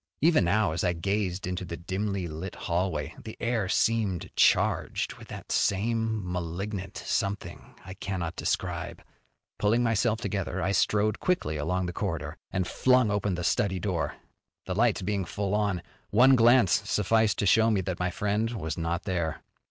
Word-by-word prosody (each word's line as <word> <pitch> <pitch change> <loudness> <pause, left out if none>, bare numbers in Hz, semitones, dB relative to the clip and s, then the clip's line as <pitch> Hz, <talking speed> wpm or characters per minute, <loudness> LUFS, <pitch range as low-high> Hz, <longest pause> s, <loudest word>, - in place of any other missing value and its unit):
Even 160 - +4
now, 100 +2 +2
as 80 - -2
I 90 - +2
gazed 95 +1 -1
into 90 +1 -3
the 85 -1 -6
dimly 95 +1 -2
lighted 80 +4 -6
hallway, 85 -4 -1
the 110 - -8
air 115 -5 0
seemed 105 -5 +1
charged - - +2
with - - -12
that - - -8
same 110 +1 +1
malignant 90 +3 -4
something 100 -3 -3
I 95 - -7
cannot 95 -4 -4
describe. - - -3 0.6
Pulling 115 +4 +3
myself 115 -1 +1
together 95 -5 -3
I 95 - 0
strode 105 +3 +2
quickly 175 - 0
along 90 +5 -1
the 90 - -4
corridor, 85 -5 -3
and 95 -1 -1
flung 125 -1 +3
open 100 -2 0
the 90 - -4
study 95 +2 +1
door. 85 -6 -2 0.5
The 95 - -2
lights 110 0 +2
being 100 0 -1
full 100 +3 -3
on, 100 -5 0 0.3
one 130 +5 +6
glance 115 -4 +4
sufficed 110 +1 +2
to - - 0
show 110 +3 +5
me 105 -4 +2
that 90 -1 -4
my 90 0 0
friend 105 +5 -1
was 80 -1 -4
not 85 +2 -2
there. 85 -5 -2
95 Hz, 165 wpm, -28 LUFS, 90-110 Hz, 0.6 s, one